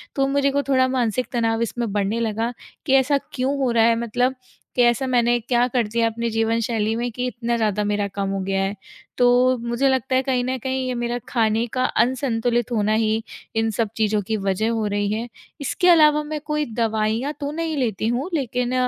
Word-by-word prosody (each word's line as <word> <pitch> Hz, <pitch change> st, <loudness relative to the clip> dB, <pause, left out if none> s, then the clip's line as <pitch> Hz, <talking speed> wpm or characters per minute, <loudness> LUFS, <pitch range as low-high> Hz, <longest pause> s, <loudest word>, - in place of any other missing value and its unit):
तो 270 Hz, -1 st, +2 dB
मेरे 280 Hz, 0 st, +2 dB
को 285 Hz, +1 st, 0 dB
थोड़ा 260 Hz, -1 st, +4 dB
मानसिक 250 Hz, -2 st, 0 dB
तनाव 230 Hz, -2 st, 0 dB
इसमें 235 Hz, -1 st, -2 dB
बढ़ने 205 Hz, +2 st, 0 dB
लगा 225 Hz, +1 st, -1 dB, 0.3 s
कि, 270 Hz, -, +1 dB
"ऐसा 270 Hz, +2 st, +4 dB, 0.2 s
क्यों 270 Hz, +2 st, -1 dB
हो 265 Hz, -2 st, +1 dB
रहा 230 Hz, -1 st, +4 dB
है? 230 Hz, 0 st, +4 dB
मतलब 245 Hz, +3 st, 0 dB, 0.4 s
कि 245 Hz, -, +4 dB
ऐसा 240 Hz, +3 st, +3 dB
मैंने 240 Hz, -1 st, +2 dB
क्या 240 Hz, +1 st, +1 dB
कर 245 Hz, -3 st, 0 dB
दिया 230 Hz, +2 st, +1 dB
अपने 230 Hz, +1 st, -2 dB
जीवनशैली 225 Hz, -1 st, 0 dB
में 240 Hz, +1 st, -2 dB
कि 245 Hz, +2 st, -3 dB
इतना 235 Hz, 0 st, -2 dB
ज़्यादा 210 Hz, -2 st, 0 dB
मेरा 205 Hz, 0 st, 0 dB
कम 200 Hz, -1 st, -1 dB
हो 195 Hz, 0 st, -2 dB
गया 195 Hz, 0 st, -1 dB
है?" 195 Hz, +1 st, -2 dB, 0.4 s
तो 250 Hz, +1 st, +4 dB
मुझे 235 Hz, +3 st, 0 dB
लगता 260 Hz, 0 st, 0 dB
है, 260 Hz, -, +4 dB
कहीं 255 Hz, -2 st, 0 dB
न 260 Hz, +1 st, -1 dB
कहीं 260 Hz, 0 st, -1 dB
ये 255 Hz, -, -1 dB
मेरा 240 Hz, 0 st, -2 dB
खाने 225 Hz, -2 st, +1 dB
का 255 Hz, -, 0 dB, 0.2 s
अनसंतुलित 240 Hz, -2 st, -1 dB
होना 215 Hz, -2 st, +1 dB
ही 220 Hz, 0 st, +1 dB, 0.3 s
इन 225 Hz, 0 st, +1 dB
सब 225 Hz, -3 st, +1 dB
चीज़ों 215 Hz, -1 st, +1 dB
की 220 Hz, -, 0 dB
वज़ह 195 Hz, +2 st, 0 dB
हो 225 Hz, -2 st, -1 dB
रही 205 Hz, 0 st, -1 dB
है। 225 Hz, +2 st, -3 dB, 0.3 s
इसके 320 Hz, +6 st, 0 dB
अलावा 300 Hz, -3 st, +6 dB
मैं 300 Hz, 0 st, -4 dB
कोई 300 Hz, 0 st, -1 dB
दवाइयाँ 225 Hz, +4 st, 0 dB
तो 285 Hz, -1 st, -3 dB
नहीं 325 Hz, 0 st, -3 dB
लेती 220 Hz, -5 st, -1 dB
हूँ, 250 Hz, +8 st, -1 dB
लेकिन 250 Hz, -4 st, -1 dB
235 Hz, 205 wpm, -22 LUFS, 220-260 Hz, 0.4 s, अलावा